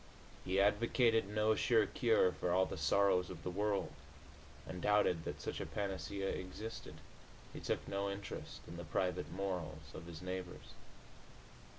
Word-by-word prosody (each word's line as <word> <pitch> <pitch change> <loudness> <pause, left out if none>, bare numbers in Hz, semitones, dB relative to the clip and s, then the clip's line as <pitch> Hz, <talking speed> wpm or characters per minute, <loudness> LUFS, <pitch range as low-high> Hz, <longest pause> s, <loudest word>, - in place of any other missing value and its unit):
He 95 +1 +1
advocated 115 +2 +4
no 105 +1 +3
sure 110 0 +4
cure 110 -6 +3
for 90 - -2
all 95 +1 +4
the - - -5
sorrows 95 -2 +3
of 85 -3 -8
the 90 - -2
world, 100 +1 0 0.7
and 90 - -6
doubted 105 -5 +3
that - - -4
such - - -4
a - - -2
panacea 100 0 -2
existed. 105 +5 -5 0.6
He - - -6
took - - -2
no 100 0 -1
interest 100 0 -6
in 85 - -7
the 85 - -5
private 85 -1 -1
morals 85 -6 -4
of 85 - -8
his 85 0 -8
neighbors. 90 -1 -5
95 Hz, 155 wpm, -37 LUFS, 90-105 Hz, 0.7 s, advocated